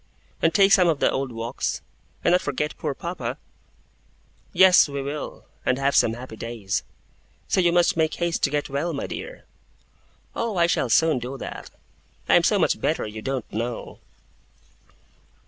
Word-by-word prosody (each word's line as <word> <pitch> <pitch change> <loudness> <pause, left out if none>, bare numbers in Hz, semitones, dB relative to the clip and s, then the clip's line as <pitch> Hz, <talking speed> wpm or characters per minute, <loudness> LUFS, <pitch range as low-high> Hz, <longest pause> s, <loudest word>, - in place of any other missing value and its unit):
And 165 - +3
take 195 +4 +4
some 185 -3 +6
of 160 -4 +1
the - - +3
old 135 -1 -2
walks? 115 +2 -3 0.4
And - - +3
not 180 - +4
forget 150 +1 -2
poor 145 -3 -3
papa?' 170 +5 -5 1.1
'Yes, 185 -5 +6
we 140 0 -4
will, 140 +2 -6 0.2
and 130 - +1
have 140 +1 +1
some 115 - +4
happy 120 -2 -9
days. 105 -5 -3 0.7
So 185 - +2
you 175 -1 +3
must 175 0 +3
make 160 -1 +1
haste 170 -1 -1
to - - 0
get 145 -1 -1
well, 145 +5 -2
my 140 - -3
dear.' - - -7 0.9
'Oh, 225 -5 -2
I 170 - +5
shall 160 -6 0
soon 160 +2 +3
do 125 +3 -6
that! - - -7 0.6
I - - +3
am - - +6
so - - +3
much - - +1
better, - - 0
you 110 0 -7
don't 135 -1 -3
know! 115 +2 -4
145 Hz, 170 wpm, -24 LUFS, 125-170 Hz, 1.1 s, some